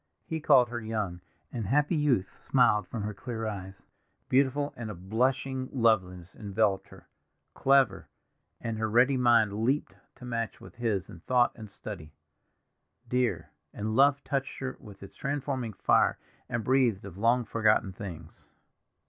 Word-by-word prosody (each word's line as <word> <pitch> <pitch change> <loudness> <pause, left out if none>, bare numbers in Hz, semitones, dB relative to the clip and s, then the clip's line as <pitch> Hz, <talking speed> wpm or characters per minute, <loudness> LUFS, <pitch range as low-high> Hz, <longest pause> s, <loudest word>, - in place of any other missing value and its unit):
He 160 - -3
called 135 -5 +5
her 120 0 -4
young, 105 -6 -3 0.3
and 115 -6 -3
happy 150 - +2
youth 135 -11 +1
smiled 105 -3 +3
from 110 -4 -4
her 105 +1 -3
clear 115 +2 -5
eyes; 95 -2 -6 0.5
beautiful, 140 +2 +2
and 115 -2 -6
a 105 - -6
blushing 130 +7 -1
loveliness 95 -8 +1
enveloped 100 -1 0
her; - - -16 0.5
clever, 135 -4 +3 0.5
and 115 -2 -4
her 110 0 0
ready 125 +5 +4
mind 120 -5 +4
leaped 135 +5 0 0.2
to 125 - -11
match 115 -3 -3
with - - -13
his 110 -6 -1
in 85 - -11
thought 125 +6 +2
and 110 -3 -10
study; 90 -7 -9 1.0
dear, 115 -10 0 0.2
and 110 +1 -2
love 140 +2 +4
touched 140 -1 -2
her 130 -1 -4
with 100 -2 -13
its 100 - -11
transforming 135 -5 -3
fire - - +3 0.3
and 120 -2 -2
breathed 125 -6 +2
of 95 -1 -9
long 120 +2 +3
forgotten 105 -3 +2
things. 85 -5 -9
115 Hz, 150 wpm, -29 LUFS, 100-130 Hz, 1.0 s, called